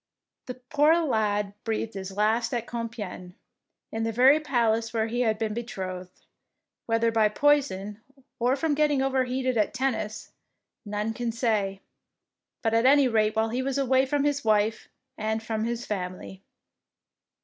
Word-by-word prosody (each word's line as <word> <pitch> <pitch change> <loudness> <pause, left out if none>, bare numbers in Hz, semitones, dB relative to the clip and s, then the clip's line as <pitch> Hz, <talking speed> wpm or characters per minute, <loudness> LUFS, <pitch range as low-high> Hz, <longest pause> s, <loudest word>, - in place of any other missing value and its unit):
The 250 - -5
poor 290 +5 +3
lad 210 -9 0
breathed 225 0 -2
his 195 0 -7
last 225 +3 +1
at 235 -1 -2
Compiegne, 225 -7 -6 0.6
in 225 - -3
the 225 0 0
very 260 +6 +5
palace 230 -6 0
where 220 -1 +2
he 240 +2 -2
had 220 -3 +1
been 220 -1 -2
be 235 +2 -3
trothed, 185 -5 -7 0.6
whether 230 0 +2
by 220 -2 +3
poison 215 -6 +1 0.4
or 245 +2 +2
from 295 +2 0
getting 290 -2 +2
overheated 260 -1 0
at 210 +4 0
tennis, 220 -5 -2 0.5
none 210 +2 -2
can 235 +1 -2
say, 215 -4 -1 0.8
but 225 -1 +1
at 230 +2 +4
any 280 0 +6
rate 215 -2 +1
while 220 0 +1
he 245 +3 -1
was 270 +1 -2
away 265 -1 +2
from 285 +1 0
his 285 -1 0
wife 215 0 +1 0.3
and 220 +1 -2
from 220 -1 -2
his 235 +1 -3
family. 185 -1 -5
225 Hz, 155 wpm, -26 LUFS, 215-260 Hz, 0.8 s, any